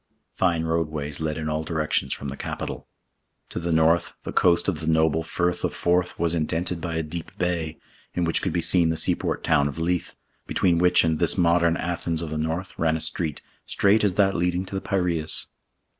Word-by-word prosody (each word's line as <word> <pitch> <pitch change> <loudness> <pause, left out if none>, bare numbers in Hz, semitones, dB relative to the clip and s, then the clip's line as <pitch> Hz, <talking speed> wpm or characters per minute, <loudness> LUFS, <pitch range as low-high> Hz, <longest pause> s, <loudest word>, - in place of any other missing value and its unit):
Fine 85 -3 +1
roadways 75 -3 -2
led 80 0 -2
in 80 -1 -3
all 75 0 -1
directions 80 -1 -1
from 70 - -4
the 70 - -5
capital. - - -5 0.6
To - - -4
the 85 0 -2
north, 80 +1 +3
the - - -5
coast 85 -1 +3
of 90 -6 0
the 80 - -5
noble 80 0 +3
Firth 90 +2 -1
of - - -1
Forth 90 +1 +1
was 85 0 0
indented 85 +2 -1
by 85 -1 -3
a 80 - 0
deep 80 +1 -6
bay, 85 -3 -1 0.4
in 90 - 0
which 85 - +2
could - - -1
be 85 - -1
seen 85 -1 +4
the 80 - 0
seaport - - +1
town 70 - +3
of 70 +1 -6
Leith, 85 +1 -1 0.3
between 85 -3 +2
which 90 0 +5
and 80 -1 +1
this 85 +2 +2
Modern 85 -1 +3
Athens 85 -1 -2
of 80 - -5
the 80 - -2
north 80 +4 -3
ran 80 -1 +2
a - - -5
street, 80 -1 -2 0.2
straight 105 +2 +2
as 100 -3 +2
that 95 -1 +3
leading 90 +1 0
to 95 - -10
the 95 - -2
Piraeus. 85 -5 -1
85 Hz, 205 wpm, -25 LUFS, 80-90 Hz, 0.6 s, which